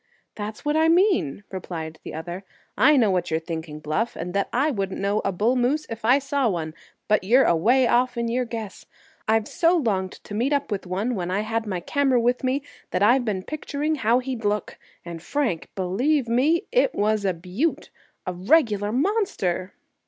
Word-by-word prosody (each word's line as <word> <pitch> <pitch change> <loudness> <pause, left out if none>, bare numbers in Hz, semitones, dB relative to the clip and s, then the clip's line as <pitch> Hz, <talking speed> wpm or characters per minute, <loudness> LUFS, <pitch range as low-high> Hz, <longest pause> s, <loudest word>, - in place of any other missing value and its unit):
"That's 215 +5 -7
what 295 +1 +1
I 320 +1 +4
mean," 340 - +2
replied 165 -4 -6
the - - -7
other. 175 +4 -6 0.3
"I 280 +7 +5
know 220 -6 +4
what 180 -2 0
you're 160 0 0
thinking, 160 -2 -6
Bluff, 155 +10 -2
and 175 +2 -5
that 200 0 0
I 280 +5 +2
wouldn't 195 -6 -3
know 200 +2 0
a 195 - 0
bull 215 +7 +1
moose 260 +5 +1
if 225 0 -6
I 245 +4 +5
saw 275 -2 0
one. 160 -4 -3 0.3
But 210 -2 +2
you're 245 +8 +5
away 235 +11 +3
off 245 +1 +2
in 235 0 -1
your 250 +2 0
guess. 225 -3 -7 0.4
I've 220 0 +2
so 340 +1 +2
longed 195 - -1
to - - -11
meet 245 +7 0
up 285 -4 -1
with 195 -2 -3
one 200 +7 -1
when 180 -5 -3
I 195 +3 0
had 225 +1 -2
my 185 -3 -3
camera 270 - +2
with 245 +3 +1
me 265 +2 0 0.3
that 185 - 0
I've 245 +5 +5
been 195 -4 -2
picturing 300 +3 -3
how 240 -5 +2
he'd 255 -2 -4
look. 210 -1 -2 0.3
And, 170 -1 -7
Frank, 230 - -2
believe 240 +10 +1
me, 285 - +2
it - - +2
was 215 0 +1
a 190 -3 0
beaut—a 185 - -4
regular 205 - +2
monster!" 255 - -1
220 Hz, 190 wpm, -24 LUFS, 185-265 Hz, 0.4 s, I